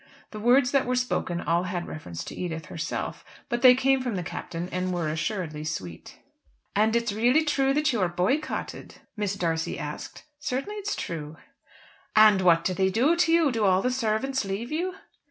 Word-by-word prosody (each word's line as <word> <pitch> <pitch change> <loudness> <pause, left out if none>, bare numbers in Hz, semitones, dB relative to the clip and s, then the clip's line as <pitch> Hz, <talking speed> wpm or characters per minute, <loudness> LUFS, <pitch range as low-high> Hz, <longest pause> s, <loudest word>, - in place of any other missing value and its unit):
The 215 - -7
words 250 +4 +4
that 275 -3 +2
were 250 - +1
spoken 245 -8 -1
all 170 +3 +1
had 180 -1 -3
reference 90 - -7
to - - -8
Edith 160 -3 -4
herself; 165 +3 -4 0.3
but 240 -2 -1
they 250 -1 +8
came 265 +1 +2
from 245 -4 -2
the 180 - -2
Captain 170 +1 -5
and 185 0 -1
were 175 -3 -1
assuredly 155 -1 -3
sweet. 95 - -6 0.6
"And 220 +2 +3
it's 235 -3 0
really 245 +9 +3
true 275 -2 +2
that 300 -2 +2
you 225 - 0
are 180 - +2
boycotted?" 185 - -2 0.2
Mrs. 205 -2 -2
D'Arcy 165 -2 -1
asked. - - -7 0.2
"Certainly 295 +8 -3
it's 415 0 -3
true." 155 -1 -5 0.8
"And 215 -3 +7
what 170 -2 +4
do 185 - 0
they 190 +1 +2
do 255 - +3
to 340 -1 +2
you? 330 -4 +4
Do 225 -3 -1
all 190 -1 +3
the 250 - +1
servants 250 +2 0
leave 200 +6 -4
you?" 355 +4 -2
215 Hz, 190 wpm, -26 LUFS, 175-260 Hz, 0.8 s, they